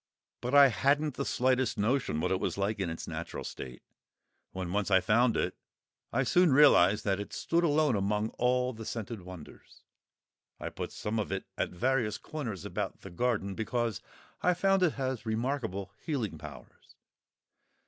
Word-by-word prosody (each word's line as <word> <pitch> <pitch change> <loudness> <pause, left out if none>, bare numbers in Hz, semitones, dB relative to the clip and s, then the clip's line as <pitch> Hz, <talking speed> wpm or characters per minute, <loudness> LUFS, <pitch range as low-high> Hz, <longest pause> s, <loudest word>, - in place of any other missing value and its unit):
But 125 +3 -1
I 140 -1 +9
hadn't 140 +5 +1
the - - -3
slightest 130 -2 +1
notion 105 - 0
what - - 0
it 95 - +1
was - - -2
like 100 +2 -1
in 95 -3 -1
its 80 - -6
natural - - -5
state. 65 -1 -8 0.7
When 90 -1 -4
once 105 0 0
I 95 -1 +6
found 115 +6 +3
it, - - -1 0.6
I 135 +3 +1
soon 175 +5 +4
realised 110 -8 +6
that 100 -1 +1
it 105 - -6
stood 170 +1 0
alone 150 -5 +3
among 105 +2 0
all 125 +1 +1
the 110 0 -8
scented 110 -1 -5
wonders. 90 -4 -12 0.8
I - - -4
put - - -6
some 110 +1 -3
of 105 - -3
it 95 0 -3
at - - -1
various 120 +2 0
corners 120 - -6
about - - -4
the - - -10
garden, 100 0 0
because 115 +1 -2 0.4
I 180 0 +3
found 195 +1 +3
it 175 -4 +3
has 130 -4 -3
remarkable 110 -4 -2
healing 115 - -2
powers. 70 -5 -12
115 Hz, 170 wpm, -30 LUFS, 100-135 Hz, 0.8 s, I